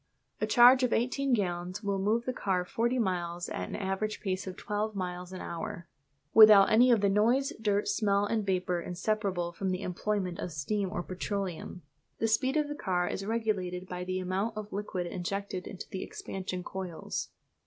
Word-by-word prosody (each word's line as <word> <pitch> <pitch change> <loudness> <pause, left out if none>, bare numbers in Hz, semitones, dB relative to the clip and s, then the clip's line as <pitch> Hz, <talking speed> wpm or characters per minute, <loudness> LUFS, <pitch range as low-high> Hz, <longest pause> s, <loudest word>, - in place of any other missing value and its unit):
A 215 - +1
charge 245 +4 +7
of 250 -2 +2
eighteen 265 +3 0
gallons 185 -2 -1
will 200 -1 0
move 220 +5 +1
the 255 - -1
car 185 -6 0
forty 235 +6 0
miles 175 -5 -1
at 90 - -4
an - - -5
average 195 +2 -2
pace 190 -1 -3
of 185 - -6
twelve 210 +1 -2
miles 180 -1 -4
an 185 - -7
hour, 170 0 -5 0.5
without 215 -3 +9
any 240 +4 +6
of 230 -4 +5
the 200 - +4
noise, 230 +7 +2
dirt, 205 -1 +1
smell, 200 -1 +2
or 225 0 0
vapour 185 -3 0
inseparable 185 -1 -1
from 190 +2 -3
the 185 +1 -2
employment 185 0 -2
of 175 - -4
steam 190 +7 -1
or 175 -3 -3
petroleum. 185 -2 -4 0.3
The 225 - +1
speed 260 +6 +2
of 300 -1 +1
the 295 - -4
car 180 -9 -1
is 195 - -3
regulated 195 -5 -1
by 180 -1 -5
the 185 +1 -2
amount 190 +5 -2
of 210 -1 -6
liquid 195 -3 -3
injected 185 +1 -4
into 185 - -8
the 190 - -5
expansion 185 -1 -5
coils. 185 -4 -5
195 Hz, 185 wpm, -30 LUFS, 180-215 Hz, 0.5 s, without